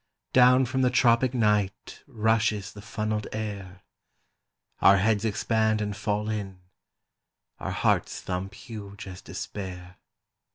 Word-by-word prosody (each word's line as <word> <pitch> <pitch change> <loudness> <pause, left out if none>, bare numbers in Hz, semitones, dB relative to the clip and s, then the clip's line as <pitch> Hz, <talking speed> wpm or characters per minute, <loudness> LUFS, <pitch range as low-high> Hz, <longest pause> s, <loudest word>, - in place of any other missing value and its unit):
"Down 125 +1 +6
from 130 +1 -1
the 125 - +4
tropic 125 0 +3
night 105 -3 0
Rushes 110 -4 0
the 105 - -10
funnelled 105 0 -3
air; 100 -4 -6 1.0
Our 100 - +7
heads 105 +2 +2
expand 110 0 +1
and 105 -1 -2
fall 105 +1 -2
in; 100 -3 -4 1.0
Our - - -4
hearts - - 0
thump 95 +2 -4
huge 105 -5 -9
as 95 -1 -9
despair. 90 -2 -7
105 Hz, 120 wpm, -27 LUFS, 100-115 Hz, 1.0 s, Our